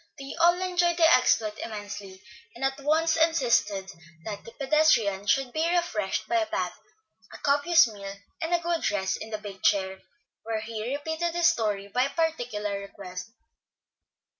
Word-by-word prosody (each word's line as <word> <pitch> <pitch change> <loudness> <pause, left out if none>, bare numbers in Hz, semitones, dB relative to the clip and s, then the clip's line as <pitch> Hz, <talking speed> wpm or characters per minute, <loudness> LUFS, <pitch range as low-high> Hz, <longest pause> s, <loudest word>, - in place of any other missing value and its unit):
They 275 -1 -7
all 345 +1 +5
enjoyed 355 -2 +1
the 330 -2 +6
exploit 215 -4 +2
immensely, 205 -3 -7 0.3
and 260 +3 -2
at 270 +1 -1
once 315 +3 +2
insisted 235 -12 +2 0.3
that 205 -2 -6
the 230 - -11
pedestrian 265 -9 +2
should 260 +3 +1
be 320 +2 +1
refreshed 280 - -1
by 350 - +1
a 330 -1 +1
bath, - - -2 0.6
a - - -9
copious 290 +4 +4
meal, 200 -2 -8 0.3
and 325 +1 -2
a 345 - +4
good 340 -1 -1
rest 190 -2 -1
in 220 - -6
the 215 - -3
big 200 -2 -9
chair, 190 -1 +1 0.4
where 225 -1 -3
he 220 +2 -5
repeated 320 +3 -2
his 345 -1 +1
story 210 -8 -2
by 250 +6 +1
particular 245 -11 -2
request. 195 -1 -8
240 Hz, 160 wpm, -27 LUFS, 205-325 Hz, 0.6 s, the